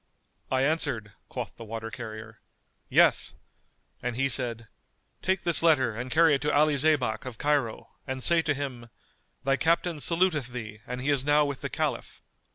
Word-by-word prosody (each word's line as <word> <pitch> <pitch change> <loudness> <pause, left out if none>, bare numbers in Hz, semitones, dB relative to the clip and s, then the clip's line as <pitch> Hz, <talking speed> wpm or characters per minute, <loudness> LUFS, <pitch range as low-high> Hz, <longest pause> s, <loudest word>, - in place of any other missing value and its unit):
"I 130 0 +1
answered 135 - 0 0.2
(quoth - - -5
the 115 - -8
water 115 0 -6
carrier), 110 -3 -8 0.5
Yes; - - +4 0.7
and 125 -1 -3
he 135 +2 +1
said, 115 -4 -2 0.5
Take 190 0 0
this 170 -2 +2
letter 135 -9 +3
and 125 +3 -5
carry 160 +2 +5
it 140 - +1
to 150 +1 0
Ali 150 +1 +4
Zaybak 135 -7 +2
of 125 -3 -8
Cairo 145 -6 0 0.2
and 130 -1 -3
say 170 -1 +5
to 155 -3 0
him, 130 -4 -5 0.5
Thy 135 +1 +2
Captain 165 +1 +1
saluteth 165 -4 +1
thee 110 -4 -7
and 125 +1 -4
he 140 +3 +1
is 140 -2 +2
now 145 +1 +4
with 140 -2 -4
the - - -3
Caliph. - - -3
135 Hz, 170 wpm, -27 LUFS, 120-150 Hz, 0.7 s, carry